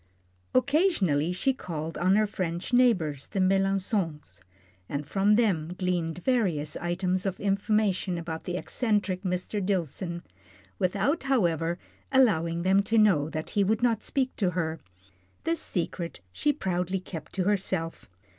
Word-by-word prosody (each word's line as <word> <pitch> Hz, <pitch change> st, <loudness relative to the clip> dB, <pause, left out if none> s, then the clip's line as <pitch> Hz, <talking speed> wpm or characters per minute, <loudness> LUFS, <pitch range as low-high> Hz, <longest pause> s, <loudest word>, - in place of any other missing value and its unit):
Occasionally 255 Hz, -, +2 dB
she 265 Hz, +9 st, +1 dB
called 165 Hz, -8 st, -5 dB
on 185 Hz, +3 st, +3 dB
her 215 Hz, +1 st, +4 dB
French 180 Hz, 0 st, -4 dB
neighbours, 180 Hz, -, +3 dB
the 200 Hz, -, -3 dB
Melançons, 190 Hz, -, 0 dB, 0.5 s
and 145 Hz, +1 st, -3 dB
from 200 Hz, +4 st, +3 dB
them 180 Hz, -7 st, +1 dB
gleaned 180 Hz, -2 st, -1 dB
various 185 Hz, -, +1 dB
items 180 Hz, +1 st, -1 dB
of 190 Hz, -, -3 dB
information 200 Hz, -2 st, +1 dB
about 165 Hz, -1 st, -5 dB
the 180 Hz, 0 st, -2 dB
eccentric 205 Hz, -5 st, 0 dB
Mr. 185 Hz, +2 st, -2 dB
Dillson, 175 Hz, -2 st, -2 dB, 0.6 s
without, 200 Hz, -, +1 dB
however, 175 Hz, -, +1 dB, 0.3 s
allowing 170 Hz, -11 st, +3 dB
them 190 Hz, +2 st, +4 dB
to 225 Hz, +3 st, 0 dB
know 185 Hz, -9 st, +4 dB
that 155 Hz, 0 st, -5 dB
he 205 Hz, -, +2 dB
would 220 Hz, +4 st, +1 dB
not 230 Hz, -3 st, +2 dB
speak 260 Hz, -2 st, -1 dB
to 190 Hz, -4 st, +2 dB
her. 165 Hz, -2 st, -2 dB, 0.6 s
This 330 Hz, 0 st, 0 dB
secret 170 Hz, -1 st, -3 dB
she 295 Hz, -, +2 dB
proudly 185 Hz, -, -1 dB
kept 165 Hz, -4 st, -8 dB
to 190 Hz, -, 0 dB
herself. 190 Hz, -, -1 dB
185 Hz, 135 wpm, -28 LUFS, 170-210 Hz, 0.6 s, her